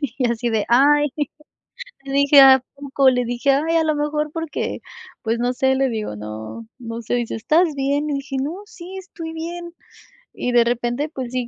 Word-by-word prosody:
y 250 -3 -1
así 235 +1 -1
de: 220 -2 0
"Ay" 290 +4 +4 0.9
le 275 - -7
dije: 280 0 +6
"¿A 265 -1 +8
poco?", 275 -1 +2
le 250 -1 +1
dije: 245 +3 0
"Ay, 320 +4 +2
a 320 - +2
lo 310 -1 +1
mejor 300 0 -1
porque, 325 -2 -4 0.4
pues 230 +1 -1
no 245 +1 0
sé", 265 +1 +2
le 270 0 +2
digo: 215 - -4
"No, 110 +1 -8
no 230 -1 -6
sé", 225 - -4
dice: 240 -2 -2
"¿Estás 310 +8 +2
bien?", 285 +2 -1
le 290 - -1
dije: 275 0 -5
"No, 290 +6 -2
sí, 380 -2 -10
estoy 335 -3 -8
bien". 340 +1 -6 0.6
Y 250 - -3
de 240 -1 +5
repente, 240 +5 -1
pues 255 -5 -6
sí, 250 -2 -2
270 Hz, 195 wpm, -21 LUFS, 240-300 Hz, 0.9 s, A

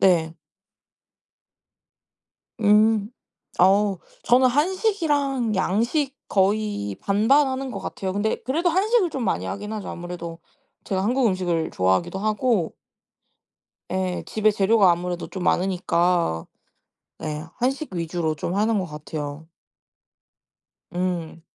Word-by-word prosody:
네. 165 -4 +3 2.3
음. 210 0 +4 0.5
어 195 +1 +4 0.3
저는 255 +2 +5
한식이랑 290 - +1
양식 240 - 0
거의 200 - 0
반반 225 +9 +3
하는 265 0 -3
것 200 - -5
같아요. 190 -1 -4
근데 205 +2 0
그래도 325 +8 +1
한식을 395 +2 +2
좀 270 -5 -4
많이 190 - 0
하긴 210 +2 -5
하죠. 210 -2 -5
아무래도 170 -1 -7 0.5
제가 190 -1 -1
한국 245 +4 +2
음식을 175 -4 0
좋아하기도 95 - +1
하고 215 -2 0 1.2
예. 185 -1 -2
집에 215 0 +2
재료가 200 -1 +4
아무래도 175 0 -3
좀 185 -3 -6
많으니까. 175 - +1 0.7
네. 155 0 -4
한식 265 -1 -1
위주로 165 -2 -1
좀 170 +5 -3
하는 215 +2 +2
것 185 - -2
같아요. 150 0 -6 1.5
음. 175 -2 -3
200 Hz, 230 characters per minute, -24 LUFS, 175-240 Hz, 2.3 s, 저는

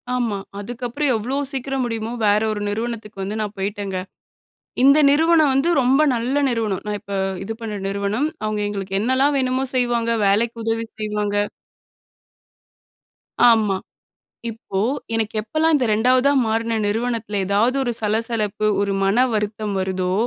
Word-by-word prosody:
ஆமா. 230 -5 -1 0.2
அதுக்கப்புறம் 245 +6 -2
எவ்ளோ 235 +5 -2 0.2
சீக்கிரம் 270 -1 -2
முடியுமோ 225 -1 -3
வேறு 210 +1 +3
ஒரு 210 -1 -3
நிறுவனத்துக்கு 220 -2 -4
வந்து 210 +3 -4
நான் 210 -1 -4
போய்ட்டேங்க. 200 -1 -3 0.9
இந்த 275 +3 +7
நிறுவனம் 315 0 +4
வந்து 275 +5 +2
ரொம்ப 260 +3 +3
நல்ல 250 +5 0
நிறுவனம், 220 -5 -1
நான் 210 -1 -2
இப்ப 200 0 -7 0.3
இது 225 - -4
பண்ண 220 -2 -5
நிறுவனம், 200 +8 -1 0.2
அவங்க 215 -1 -1
எங்களுக்கு 195 -1 -3
என்னலாம் 260 +5 +2
வேணுமோ 255 0 0
செய்வாங்க, 240 -2 +1 0.2
வேலைக்கு 230 +3 +1
உதவி 225 0 -1 0.2
செய்வாங்க. 210 -1 -1 2.1
ஆமா. 215 -4 +3 0.8
இப்போ 220 -3 -6 0.4
எனக்கு 225 -1 -1
எப்போலாம் 310 +8 +1
இந்த 265 -4 +2
2வதா 255 +5 +3
மாறுன 225 +1 0
நிறுவனத்தில 225 -1 -1
ஏதாவது 220 +6 +2
ஒரு 240 - -1
சலசலப்பு 215 -1 -1
ஒரு 200 -1 0
மன 215 +6 +3
வருத்தம் 210 -1 -2
வருதோ, 185 -1 -1
225 Hz, 135 wpm, -21 LUFS, 205-250 Hz, 2.1 s, இந்த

